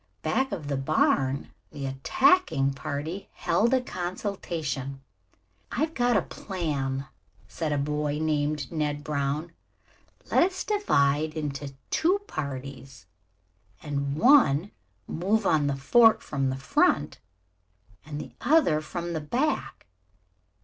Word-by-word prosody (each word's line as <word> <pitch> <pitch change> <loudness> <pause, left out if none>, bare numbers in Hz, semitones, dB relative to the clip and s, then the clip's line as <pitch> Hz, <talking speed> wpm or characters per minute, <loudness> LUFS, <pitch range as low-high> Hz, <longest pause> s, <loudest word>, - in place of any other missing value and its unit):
Back 265 -1 0
of 165 -8 -4
the 140 -1 -1
barn 135 -1 +1 0.2
the 145 -2 -6
attacking 140 - +2
party 155 +6 -5
held 235 +3 +1
a 260 -1 +3
consultation. 175 - -4 0.7
"I've 315 +1 -1
got 245 -4 +2
a 190 - +1
plan," 140 -8 -3 0.4
said 160 +5 -3
a 145 - +1
boy 150 +1 -1
named 150 -3 -1
Ned 150 -2 -2
Brown. 150 +2 -2 0.8
"Let - - +5
us 370 +2 +1
divide 155 - +1
into 145 -2 -4 0.2
two 360 +5 +3
parties 135 - -6 0.8
and 140 -1 -2
one 205 - +5 0.3
move 200 +6 0
on 150 -5 +3
the 140 - 0
fort 225 - +5
from 135 -2 -1
the 130 - -2
front 135 - +1 0.8
and 150 0 -6
the - - -8
other 245 - +3
from 170 +2 -5
the 160 - -2
back. 265 - -2
150 Hz, 120 wpm, -27 LUFS, 140-200 Hz, 0.8 s, Let